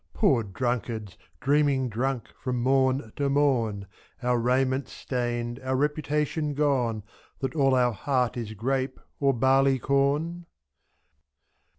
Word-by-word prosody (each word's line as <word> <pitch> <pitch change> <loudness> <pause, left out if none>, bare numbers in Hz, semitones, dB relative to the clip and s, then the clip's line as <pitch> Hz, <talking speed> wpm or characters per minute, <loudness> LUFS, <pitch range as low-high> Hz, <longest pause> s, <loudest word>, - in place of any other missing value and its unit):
Poor 140 - +3
drunkards, 110 -2 -3 0.3
dreaming 140 -2 +2
drunk 125 +2 -2
from 125 -2 -1
morn 130 -2 +1
to 140 -1 +1
morn, 120 -8 +1 0.4
5' 125 - 0
Our 120 - +2
raiment 130 +3 +1
stained, 120 -1 -3
our 130 0 -2
reputation 150 +1 -1
gone. 125 -7 +1 0.3
That 135 +1 -3
all 135 -3 +3
our 125 -1 +3
heart 125 +1 0
is 110 -3 -5
grape 130 +5 -1 0.2
or 140 -1 +3
barley 135 +2 +3
corn 145 +6 0
130 Hz, 120 wpm, -27 LUFS, 120-140 Hz, 0.4 s, Poor